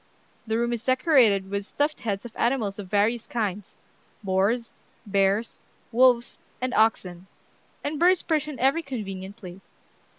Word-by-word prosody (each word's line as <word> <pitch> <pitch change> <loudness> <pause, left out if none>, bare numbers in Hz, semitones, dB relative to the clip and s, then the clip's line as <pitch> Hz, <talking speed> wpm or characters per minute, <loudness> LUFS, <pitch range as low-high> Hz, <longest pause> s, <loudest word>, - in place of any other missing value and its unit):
The 220 0 0
room 235 +1 0
is 235 -1 -4
decorated 250 - +3
with 200 0 -2
stuffed 290 +8 -1
heads 205 -1 -3
of 235 - -10
animals 230 -5 0
of 200 - -6
various 215 +3 +1
kinds, 210 -3 -3 0.5
boars, 200 +5 0 0.3
bears, 200 +2 0 0.3
wolves, 245 0 +3 0.2
and 255 0 -2
oxen; 190 -5 +1 0.6
and 290 0 -3
birds 360 +1 +4
perch 310 -3 0
in 295 -3 -6
every 270 +6 +2
convenient 200 - -6
place." 185 -2 -12
225 Hz, 140 wpm, -25 LUFS, 200-255 Hz, 0.6 s, birds